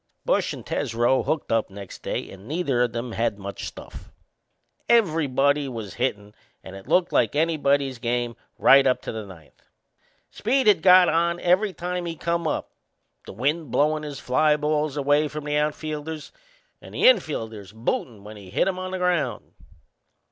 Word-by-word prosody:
Bush - - +1
and - - -8
Tesreau 120 +3 +1
hooked 155 -2 -1
up 115 -1 +1
next 100 -1 -10
day - - -3
and 95 +2 -13
neither 145 -5 0
o' 125 - +4
them 120 +1 -5
had 115 -2 -1
much 100 0 -6
stuff. - - -11 0.8
Everybody 150 - +2
was 110 -6 -7
hittin' 105 -5 -3 0.3
and 95 - -10
it 95 - -12
looked 180 -1 +2
like - - +2
anybody's 145 -5 +1
game 120 0 -2 0.2
right 135 0 +6
up 130 - +1
to - - -4
the 110 -2 -6
ninth. 85 -6 -16 0.7
Speed 260 +5 0
had 210 -1 +5
got 185 -1 +7
on 170 +2 +1
every 185 +4 +2
time 180 0 -4
he 165 - -4
come 170 +1 -1
up - - -3 0.6
the - - -8
wind 145 - -1
blowin' 150 +4 +1
his 145 -3 -7
fly 150 +4 +2
balls 150 -1 -1
away 145 +2 +2
from 150 0 -7
the 150 0 -2
outfielders 150 +1 -3 0.5
and - - -12
the - - -2
infielders 115 - +2
bootin' 110 -1 -3
when 105 +1 -10
he 100 -2 -12
hit 105 - +1
'em 185 -1 -2
on 185 0 -4
the 185 - -3
ground. 180 -3 -1
145 Hz, 170 wpm, -24 LUFS, 115-165 Hz, 0.8 s, got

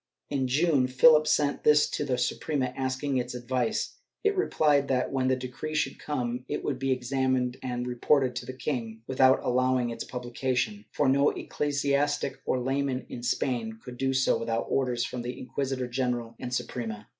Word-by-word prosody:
In 135 -2 0
June, 140 -1 +3
Philip 155 +4 +6
sent 145 -1 +1
this 150 0 +5
to - - -1
the 130 -3 0
Suprema, 130 +1 -1
asking 130 +1 -1
its 125 0 -2
advice. 130 - -2 0.2
It 420 -1 +2
replied 150 - +2
that, 125 -1 0
when 130 -1 0
the 130 - +3
decree 130 +5 -5
should 150 - -1
come, 125 -4 -3
it - - -2
would 135 -3 -2
be 135 0 0
examined 130 0 0
and 125 -1 -3
reported 125 +1 +2
to 120 - -5
the 130 - -5
king 115 -5 -4
with 130 +1 -2
out 130 0 +7
allowing 130 -1 +2
its 115 - -5
publication, 120 -4 -2
for 145 - +1
no 140 +2 +4
ecclesiastic 145 0 -1
or 130 - +1
layman 135 0 -1
in 120 - -6
Spain 120 -2 -1
could 125 +1 -10
do 135 +1 +1
so 130 0 +2
without 115 0 -1
orders 125 -3 +1
from 125 0 -5
the 125 +1 -5
Inquisitor 130 0 -3
general 120 -2 -2
and 125 -1 -5
Su 125 - 0
prema. 110 -4 -6
130 Hz, 180 wpm, -28 LUFS, 125-140 Hz, 0.2 s, out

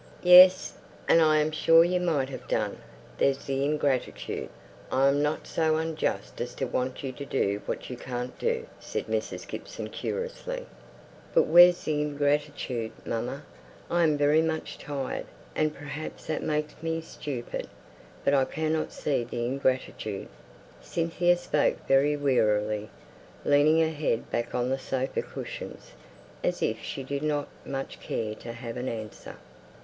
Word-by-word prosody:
"Yes; 180 +1 +8 0.3
and 165 - +6
I 155 -1 +5
am 155 +1 +2
sure 165 +1 +6
you 180 +1 +1
might 155 -7 +1
have 135 - -8
done, - - -1 0.4
there's 135 -1 +2
the 135 0 0
ingratitude! 145 -3 -1 0.4
I 135 +1 +4
am 140 +1 +2
not 150 +1 -1
so 160 -1 +1
unjust 160 -1 -2
as 120 0 -4
to 135 - -1
want 130 +1 -2
you 135 - -2
to 135 +2 -8
do 105 -7 0
what - - -3
you 125 - -5
can't 125 0 -5
do!" 470 0 0
said - - -4
Mrs. - - -3
Gibson, - - -6
querulously. - - -4 0.7
"But 485 - +7
where's 175 - +7
the 150 -1 0
ingratitude, 145 -5 -1
mamma? 120 +5 -3 0.5
I'm 165 -3 +3
very 145 +2 +4
much 160 -1 -3
tired, 140 -3 -4 0.3
and 155 0 +2
perhaps 145 +1 -7
that 155 - -2
makes 150 0 -1
me 165 0 -1
stupid; 140 -6 -5 0.6
but 140 - +4
I 135 -2 +4
cannot 155 +1 -1
see 140 -5 -1
the 120 0 -3
ingratitude." 130 -5 -1 0.5
Cynthia 175 +1 +1
spoke 150 -4 0
very 140 +2 +4
wearily, 105 -6 +1 0.6
leaning 145 +3 +5
her 160 0 +1
head 145 -6 -1
back 120 - -2
on 125 0 0
the 135 +1 0
sofa 130 0 -2
cushions, - - -8 0.5
as - - 0
if - - 0
she 135 - -5
did 140 +1 -3
not 150 -1 0 0.5
care 110 -2 -2
to 115 +2 -8
have 115 0 -6
an 125 +1 -3
answer. 110 -2 -7
145 Hz, 150 wpm, -28 LUFS, 130-160 Hz, 0.7 s, Yes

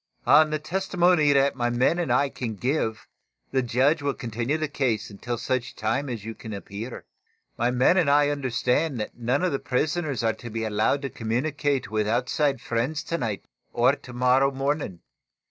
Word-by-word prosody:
On 155 +1 +6
the 155 - 0
testimony 175 -1 +2
that 140 0 +3
my 120 -2 0
men 125 +8 +2
and 165 -7 -1
I 140 +3 +3
can 115 -5 -5
give 115 -1 -1 0.5
the 130 - +2
judge 130 +6 +2
will 140 -1 -1
continue 120 +4 -2
the 155 0 -1
case 125 -8 -1
until 120 +4 -4
such 125 +2 -2
time 120 +6 -1
as 115 -4 -5
you 115 - -5
can 110 -1 -8
appear. 100 +4 -7 0.5
My 120 +1 +1
men 125 +8 +3
already 145 -3 +4
understand 130 +1 0
that 105 - -5
none 125 +7 0
of 185 - +2
the 140 - -1
prisoners 145 -1 -1
are 110 0 +2
to 120 - -9
be 115 0 -3
allowed 110 +6 +1
to 135 - -3
communicate 135 +1 -1
with 110 -1 0
outside 125 +3 0
friends 125 +7 -2
to 170 - -3
night 110 -6 -3 0.3
or - - +4
to - - -13
morrow 125 +2 +3
morning. 135 - -2
130 Hz, 180 wpm, -25 LUFS, 115-145 Hz, 0.5 s, On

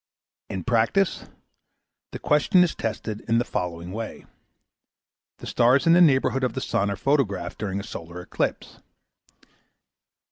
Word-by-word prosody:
In 95 - -4
practice, 125 - +1 0.9
the - - -5
question 150 +5 +3
is 175 - 0
tested 110 -1 -4
in 115 0 +2
the 120 - +1
following 85 -3 -4
way. 110 +2 -6 1.1
The - - -11
stars 125 +5 +3
in 165 - +6
the 175 - +6
neighbourhood 135 -4 +3
of 125 -3 0
the - - -3
sun 100 +1 0
are 100 - -2
photographed 100 -8 -1
during 100 -2 -3
a - - -6
solar 85 -5 -8
eclipse. 90 - -4
115 Hz, 140 wpm, -24 LUFS, 100-135 Hz, 1.1 s, in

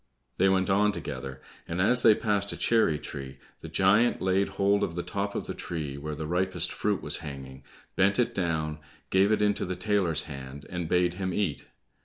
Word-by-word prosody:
They 95 +1 +4
went 95 -1 +2
on 105 +2 +3
together, 65 -6 -6 0.3
and 85 +2 -3
as 120 +6 +5
they 110 -3 +7
passed 100 -2 0
a - - -6
cherry 110 -10 +2
tree, 70 -2 -7 0.2
the - - -9
giant 105 +6 +3
laid 95 +1 +1
hold 100 +1 +3
of 85 - -2
the 85 - -2
top 100 +3 -3
of - - -3
the - - -4
tree 75 -5 -5
where 75 +2 -5
the 75 - -5
ripest 90 +4 +1
fruit - - -1
was - - -2
hanging, 70 -3 -8 0.3
bent 100 +1 +3
it 125 - +1
down, 80 -4 -1 0.3
gave 95 +2 +4
it 105 -1 +2
into 105 -1 +1
the 90 0 -3
tailor's 90 -5 0
hand, 70 -1 -9
and 90 -2 -3
bade 90 -1 +2
him 95 -1 -1
eat. 95 -9 -1
90 Hz, 200 wpm, -28 LUFS, 75-100 Hz, 0.3 s, they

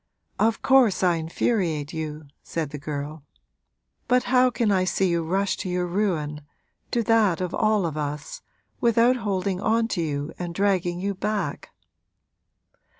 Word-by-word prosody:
'Of 225 +1 +1
course 255 -8 +4
I 175 -2 +3
infuriate 160 -2 -1
you,' 155 -1 -5 0.2
said 160 -4 -4
the 150 - -6
girl; 145 +1 -5 0.8
'but 250 0 +3
how 255 0 +4
can 235 -3 0
I 185 -2 +3
see 185 0 +1
you 170 -1 0
rush 190 +4 0
to 185 - -4
your 180 0 0
ruin 170 -6 -1 0.5
to 235 - 0
that 220 -6 +3
of 180 -1 -3
all 215 -3 +2
of 160 -3 -3
us 150 0 -4 0.4
without 235 +2 +4
holding 195 -4 -2
on 225 +1 +2
to 180 - -1
you 145 -2 -3
and 175 -1 -5
dragging 185 -3 +1
you 200 +2 -1
back?' 210 +2 -3
185 Hz, 150 wpm, -25 LUFS, 160-215 Hz, 0.8 s, course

